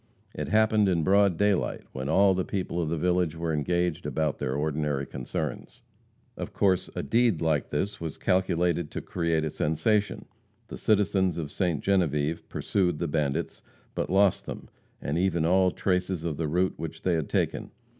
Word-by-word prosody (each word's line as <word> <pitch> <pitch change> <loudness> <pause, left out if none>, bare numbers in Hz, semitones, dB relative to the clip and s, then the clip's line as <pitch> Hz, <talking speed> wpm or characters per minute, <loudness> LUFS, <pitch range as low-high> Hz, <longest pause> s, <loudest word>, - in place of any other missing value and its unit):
It - - -4
happened 110 -2 +3
in 85 -3 +1
broad 100 0 +4
daylight, 105 -2 +1
when 65 +1 -4
all 95 +4 +5
the 95 0 0
people 90 -3 -2
of 80 - -2
the 85 - -1
village 90 -1 +1
were 80 0 -2
engaged 85 +1 0
about 75 0 -1
their 65 - -2
ordinary 75 -1 -1
concerns. 65 -2 -5 0.5
Of - - -6
course 95 -3 +2
a - - -2
deed 115 -7 +2
like 80 -3 0
this 100 +7 -2
was 80 -3 -5
calculated 90 -3 +1
to - - -5
create 85 -2 -1
a 75 - -3
sensation. 100 +9 0 0.4
The - - -7
citizens 95 -4 +2
of 75 -4 -4
Ste. 90 -5 -1
Genevieve 80 -5 0
pursued 90 -5 0
the 85 - -2
bandits, 75 -3 -2 0.3
but - - -2
lost 95 0 +3
them, - - -7 0.3
and 75 +4 -1
even 85 -3 +1
all 95 +2 +4
traces 90 -2 -1
of 80 -4 -2
the 80 - -1
route 90 +5 +1
which 80 -1 -7
they 90 - +2
had 80 -4 -1
taken. - - -1
85 Hz, 175 wpm, -27 LUFS, 75-95 Hz, 0.5 s, all